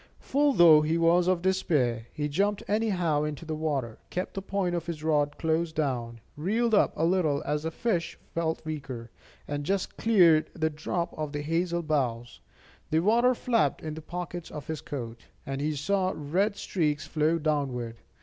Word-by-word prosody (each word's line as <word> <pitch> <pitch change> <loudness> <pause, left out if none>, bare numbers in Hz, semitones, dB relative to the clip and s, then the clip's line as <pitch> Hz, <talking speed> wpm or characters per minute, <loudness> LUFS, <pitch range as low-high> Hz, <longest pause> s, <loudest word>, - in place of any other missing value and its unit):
Full 285 +1 +2
though 165 -7 +8
he 155 +2 +1
was 170 +1 +4
of 180 -2 +1
despair, 135 -11 +1
he 150 -1 -2
jumped 200 +8 0
anyhow 190 -9 +1
into 150 +1 -4
the 160 - -3
water, 145 -7 -2
kept 180 - -3
the 195 - -4
point 195 -2 -1
of 170 -1 -3
his 160 -3 -5
rod 150 -2 +1
close 160 0 0
down, 125 -7 -2
reeled 220 +9 0
up 205 - +4
a 160 - +1
little 165 -5 +1
as 150 0 0
the 160 - -2
fish 175 0 -2 0.2
felt 160 -1 -2
weaker, 135 -7 -6 0.4
and 145 0 -3
just 195 +5 -2
cleared 175 -8 +5
the 160 -1 0
drop 170 +3 -3
of 155 -1 -4
the 145 0 -3
hazel 170 +2 0
boughs. 125 -6 -1 0.5
The 160 +1 +2
water 235 +6 +4
flapped 230 - +1
into 155 0 -5
the - - -28
pockets 175 -1 -5
of 150 - -7
his 160 -2 -4
coat, 120 -5 -6 0.3
and 135 -1 -3
he 150 +1 -1
saw 190 +5 0
red 185 +8 0
streaks 155 -7 -1
flow 155 +2 +1
downward. 135 -7 -1
160 Hz, 180 wpm, -28 LUFS, 145-180 Hz, 0.5 s, though